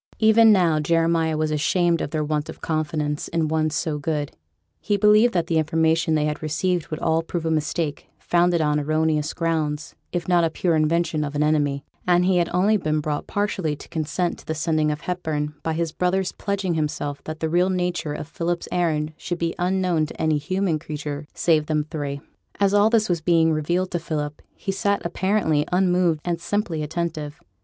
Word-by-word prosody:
Even 220 Hz, 0 st, +6 dB
now 175 Hz, -6 st, +4 dB
Jeremiah 165 Hz, 0 st, +1 dB
was 155 Hz, 0 st, 0 dB
ashamed 170 Hz, +3 st, +2 dB
of -, -, -2 dB
their 155 Hz, 0 st, -1 dB
want 150 Hz, 0 st, -2 dB
of -, -, -8 dB
confidence 150 Hz, -2 st, -2 dB
in 165 Hz, -2 st, 0 dB
one 155 Hz, 0 st, +1 dB
so 150 Hz, 0 st, -2 dB
good; 145 Hz, -1 st, -2 dB, 0.5 s
he 205 Hz, -1 st, 0 dB
believed 210 Hz, +3 st, +5 dB
that 170 Hz, -2 st, +2 dB
the 165 Hz, -1 st, +1 dB
information 160 Hz, +1 st, +2 dB
they 150 Hz, -1 st, +1 dB
had 150 Hz, 0 st, -2 dB
received 170 Hz, +3 st, -1 dB
would 155 Hz, -, -5 dB
all 160 Hz, 0 st, +1 dB
prove 165 Hz, 0 st, -4 dB
a 160 Hz, -, +1 dB
mistake, 155 Hz, -1 st, -2 dB
founded 175 Hz, -1 st, +2 dB
on 150 Hz, -1 st, +2 dB
erroneous 155 Hz, +1 st, 0 dB
grounds, 155 Hz, -3 st, -2 dB, 0.2 s
if 175 Hz, -1 st, -3 dB
not 175 Hz, -1 st, +4 dB
a 165 Hz, -, +2 dB
pure 170 Hz, +1 st, 0 dB
invention 155 Hz, 0 st, +1 dB
of 145 Hz, 0 st, -4 dB
an 150 Hz, -, +2 dB
enemy; 145 Hz, -2 st, +1 dB, 0.2 s
and 180 Hz, 0 st, +4 dB
he 185 Hz, -1 st, +3 dB
had 170 Hz, -1 st, +1 dB
only 200 Hz, +5 st, +3 dB
been 155 Hz, -4 st, 0 dB
brought 150 Hz, -1 st, -3 dB
partially 195 Hz, -7 st, -1 dB
to -, -, -12 dB
consent 165 Hz, +2 st, -2 dB
to -, -, -16 dB
the 160 Hz, -, -2 dB
sending 155 Hz, -1 st, +1 dB
of 150 Hz, 0 st, -3 dB
Hepburn, 155 Hz, -4 st, -2 dB
by 160 Hz, -, -2 dB
his 165 Hz, 0 st, -1 dB
brother's 180 Hz, +2 st, 0 dB
pledging 200 Hz, -3 st, -2 dB
himself 150 Hz, -2 st, -3 dB
that 155 Hz, 0 st, -6 dB
the 160 Hz, -, -1 dB
real 175 Hz, +3 st, +2 dB
nature 180 Hz, -4 st, -1 dB
of 150 Hz, -, -6 dB
Philip's 170 Hz, +1 st, -3 dB
errand 155 Hz, -3 st, 0 dB
should 175 Hz, -, -4 dB
be 165 Hz, -1 st, -1 dB
unknown 180 Hz, -3 st, +1 dB
to -, -, -11 dB
any 155 Hz, -2 st, +2 dB
human 185 Hz, +1 st, -1 dB
creature, 145 Hz, -1 st, -6 dB
save 155 Hz, -3 st, +2 dB
them 150 Hz, -1 st, +1 dB
three. 140 Hz, -3 st, -4 dB, 0.4 s
As 200 Hz, -1 st, +3 dB
all 205 Hz, +1 st, +5 dB
this 225 Hz, -2 st, +3 dB
was 170 Hz, -3 st, 0 dB
being 165 Hz, -1 st, +3 dB
revealed 175 Hz, +5 st, -1 dB
to 175 Hz, -, -1 dB
Philip, 150 Hz, -3 st, -4 dB
he 195 Hz, -, -3 dB
sat 200 Hz, 0 st, 0 dB
apparently 170 Hz, -4 st, +1 dB
unmoved 180 Hz, -3 st, +2 dB
and 170 Hz, -1 st, -2 dB
simply 185 Hz, -4 st, -1 dB
attentive. 155 Hz, -1 st, -4 dB
160 Hz, 195 wpm, -23 LUFS, 155-180 Hz, 0.5 s, Even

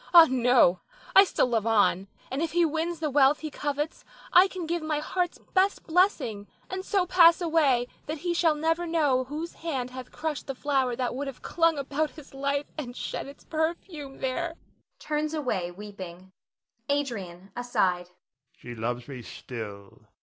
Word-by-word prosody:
Ah, 335 Hz, -1 st, +12 dB
no, 245 Hz, -8 st, +4 dB, 0.4 s
I 390 Hz, -, +11 dB
still 385 Hz, -, +1 dB
love 230 Hz, -3 st, 0 dB
on; 205 Hz, -3 st, +3 dB, 0.2 s
and 270 Hz, +3 st, -2 dB
if 330 Hz, -1 st, -1 dB
he 345 Hz, 0 st, +4 dB
wins 325 Hz, +2 st, -2 dB
the 305 Hz, -2 st, -1 dB
wealth 280 Hz, +1 st, +4 dB
he 310 Hz, -1 st, -5 dB
covets 295 Hz, +2 st, -3 dB, 0.3 s
I 365 Hz, +2 st, +8 dB
can 370 Hz, -3 st, -6 dB
give 340 Hz, +1 st, -1 dB
my 310 Hz, -1 st, -1 dB
heart's 355 Hz, +3 st, -1 dB, 0.2 s
best 385 Hz, +1 st, +2 dB
blessing, 300 Hz, -, +1 dB, 0.2 s
and 375 Hz, 0 st, -3 dB
so 385 Hz, -2 st, +1 dB
pass 340 Hz, -1 st, +6 dB
away 305 Hz, -8 st, +2 dB, 0.2 s
that 310 Hz, +2 st, -3 dB
he 345 Hz, +3 st, -1 dB
shall 330 Hz, -2 st, +3 dB
never 325 Hz, +3 st, 0 dB
know 290 Hz, -6 st, +2 dB
whose 310 Hz, +5 st, -5 dB
hand 265 Hz, -7 st, -3 dB
hath 255 Hz, 0 st, -8 dB
crushed 315 Hz, -2 st, -4 dB
the 270 Hz, -, -4 dB
flower 265 Hz, -3 st, 0 dB
that 250 Hz, 0 st, -1 dB
would 280 Hz, +3 st, -4 dB
have 270 Hz, -, -8 dB
clung 330 Hz, -2 st, +2 dB
about 285 Hz, +2 st, -1 dB
his 305 Hz, -3 st, -14 dB
life 280 Hz, +1 st, -2 dB
and 245 Hz, -4 st, -6 dB
shed -, -, -4 dB
its 280 Hz, -, -12 dB
perfume 315 Hz, -3 st, -3 dB
there 325 Hz, +6 st, -2 dB, 0.4 s
[turns 305 Hz, +1 st, -2 dB
away 215 Hz, -, -1 dB
weeping]. 185 Hz, -1 st, -9 dB, 0.6 s
Adrian 200 Hz, -10 st, -3 dB
[aside]. 200 Hz, -8 st, 0 dB, 0.5 s
She 120 Hz, -, -9 dB
loves 120 Hz, +2 st, -3 dB
me 135 Hz, -3 st, -7 dB
still. 105 Hz, -4 st, -9 dB
285 Hz, 170 wpm, -27 LUFS, 240-325 Hz, 0.6 s, Ah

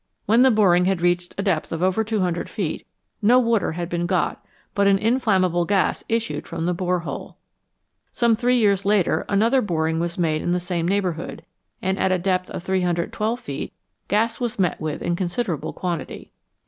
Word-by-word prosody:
When 225 Hz, +4 st, +4 dB
the 265 Hz, -, +7 dB
boring 190 Hz, -6 st, +4 dB
had 190 Hz, -1 st, +1 dB
reached 175 Hz, 0 st, 0 dB
a 200 Hz, -, -1 dB
depth 185 Hz, -6 st, 0 dB
of 165 Hz, +1 st, -2 dB
over 190 Hz, +4 st, +2 dB
200 190 Hz, -6 st, -1 dB
feet, -, -, -4 dB, 0.3 s
no 230 Hz, +4 st, +5 dB
water 230 Hz, -8 st, +2 dB
had 170 Hz, +1 st, -3 dB
been 175 Hz, 0 st, -2 dB
got, -, -, -1 dB, 0.3 s
but 200 Hz, 0 st, +2 dB
an 195 Hz, -1 st, +5 dB
inflam 220 Hz, -2 st, +2 dB
mable 175 Hz, -1 st, +1 dB
gas 195 Hz, -2 st, +1 dB
issued 230 Hz, 0 st, -2 dB
from 165 Hz, 0 st, -4 dB
the 180 Hz, -, +1 dB
bore 180 Hz, 0 st, -1 dB
hole. 170 Hz, -, -7 dB, 0.7 s
Some 235 Hz, -1 st, +2 dB
three 245 Hz, +3 st, +2 dB
years 200 Hz, -4 st, +3 dB
later 200 Hz, -3 st, +2 dB
another 230 Hz, +6 st, +3 dB
boring 160 Hz, -5 st, 0 dB
was 170 Hz, 0 st, -2 dB
made 160 Hz, -3 st, 0 dB
in 175 Hz, -, 0 dB
the 180 Hz, -, +1 dB
same 175 Hz, -1 st, -2 dB
neighbourhood, 180 Hz, -4 st, -2 dB, 0.4 s
and 190 Hz, +1 st, 0 dB
at 190 Hz, -, +2 dB
a 185 Hz, -, +3 dB
depth 185 Hz, 0 st, -1 dB
of -, -, -6 dB
312 190 Hz, +5 st, -1 dB
feet 140 Hz, -, -6 dB, 0.3 s
gas 225 Hz, +3 st, +1 dB
was 240 Hz, -1 st, -2 dB
met 180 Hz, -4 st, 0 dB
with 155 Hz, -1 st, -3 dB
in 175 Hz, -, 0 dB
consider 180 Hz, +3 st, -1 dB
able -, -, -6 dB
quantity. 175 Hz, -4 st, -5 dB
185 Hz, 190 wpm, -23 LUFS, 175-215 Hz, 0.7 s, the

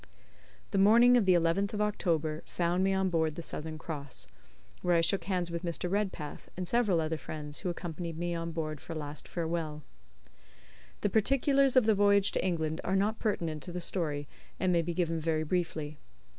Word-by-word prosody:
The 195 Hz, -, +1 dB
morning 235 Hz, +5 st, +7 dB
of 225 Hz, -6 st, +3 dB
the 185 Hz, -, +6 dB
11th 175 Hz, +5 st, +1 dB
of 210 Hz, -, -1 dB
October 165 Hz, -7 st, 0 dB
found 175 Hz, +1 st, 0 dB
me 195 Hz, -, +3 dB
on 190 Hz, -1 st, +1 dB
board 160 Hz, -2 st, +1 dB
the 170 Hz, -, -6 dB
Southern 155 Hz, 0 st, -5 dB
Cross, 145 Hz, -, -6 dB, 0.6 s
where 175 Hz, -1 st, +2 dB
I 165 Hz, -, +4 dB
shook 195 Hz, +4 st, +1 dB
hands 180 Hz, -3 st, -1 dB
with 170 Hz, 0 st, -3 dB
Mr. 170 Hz, -1 st, -2 dB
Redpath 195 Hz, -7 st, -3 dB
and 185 Hz, -1 st, -3 dB
several 215 Hz, -7 st, +2 dB
other 160 Hz, 0 st, -1 dB
friends 150 Hz, -1 st, -5 dB
who 185 Hz, -, -2 dB
accompanied 170 Hz, -1 st, -5 dB
me 175 Hz, +1 st, -2 dB
on 165 Hz, 0 st, -3 dB
board 155 Hz, -2 st, -4 dB
for 165 Hz, -, -7 dB
a -, -, -4 dB
last 145 Hz, -1 st, -6 dB
farewell. 160 Hz, -3 st, -3 dB, 1.2 s
The 205 Hz, -, +1 dB
particulars 275 Hz, +5 st, +3 dB
of 255 Hz, -4 st, +6 dB
the 220 Hz, -, +5 dB
voyage 200 Hz, 0 st, +4 dB
to -, -, -1 dB
England 160 Hz, -3 st, -1 dB
are 190 Hz, -, 0 dB
not 210 Hz, +3 st, +1 dB
pertinent 165 Hz, -8 st, -1 dB
to 180 Hz, -, -7 dB
the 180 Hz, -, -4 dB
story, 150 Hz, -5 st, -1 dB, 0.3 s
and 185 Hz, -1 st, +2 dB
may 170 Hz, -, +4 dB
be 170 Hz, +1 st, -3 dB
given 165 Hz, -2 st, 0 dB
very 160 Hz, 0 st, 0 dB
briefly. 155 Hz, -3 st, -2 dB
170 Hz, 195 wpm, -31 LUFS, 160-195 Hz, 1.2 s, morning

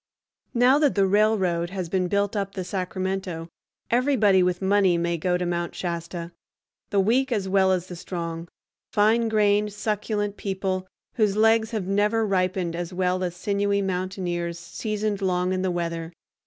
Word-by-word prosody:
Now 250 Hz, +4 st, +5 dB
that 295 Hz, -3 st, +3 dB
the 200 Hz, -1 st, +4 dB
railroad 190 Hz, -4 st, +2 dB
has 185 Hz, -2 st, -4 dB
been 185 Hz, +1 st, 0 dB
built 200 Hz, +2 st, 0 dB
up 195 Hz, -1 st, -2 dB
the 190 Hz, -, -3 dB
Sacramento, 185 Hz, -2 st, -3 dB, 0.4 s
everybody 230 Hz, -6 st, +4 dB
with 180 Hz, -1 st, +1 dB
money 190 Hz, -2 st, +3 dB
may 170 Hz, 0 st, 0 dB
go 180 Hz, +2 st, 0 dB
to 180 Hz, -, -2 dB
Mount 175 Hz, 0 st, -2 dB
Shasta, 170 Hz, -1 st, -4 dB, 0.6 s
the 200 Hz, -, +1 dB
weak 250 Hz, +7 st, +2 dB
as 205 Hz, -5 st, 0 dB
well 190 Hz, 0 st, +3 dB
as 180 Hz, -2 st, 0 dB
the 180 Hz, -, -8 dB
strong, 170 Hz, -1 st, -5 dB, 0.4 s
fine 225 Hz, +2 st, +3 dB
grained, 210 Hz, -1 st, +2 dB
succulent 210 Hz, -1 st, -2 dB
people, 190 Hz, -1 st, -2 dB, 0.3 s
whose 210 Hz, -3 st, +2 dB
legs 225 Hz, 0 st, +4 dB
have 215 Hz, -5 st, -3 dB
never 210 Hz, +3 st, +2 dB
ripened, 185 Hz, -3 st, 0 dB
as 175 Hz, +1 st, -4 dB
well 185 Hz, 0 st, 0 dB
as 175 Hz, -1 st, -3 dB
sinewy 200 Hz, +1 st, 0 dB
mountaineers 180 Hz, -2 st, -2 dB
seasoned 210 Hz, +4 st, -3 dB
long 180 Hz, -1 st, +1 dB
in 185 Hz, -, -1 dB
the 190 Hz, -, 0 dB
weather. 170 Hz, -1 st, -3 dB
190 Hz, 160 wpm, -25 LUFS, 180-210 Hz, 0.6 s, Now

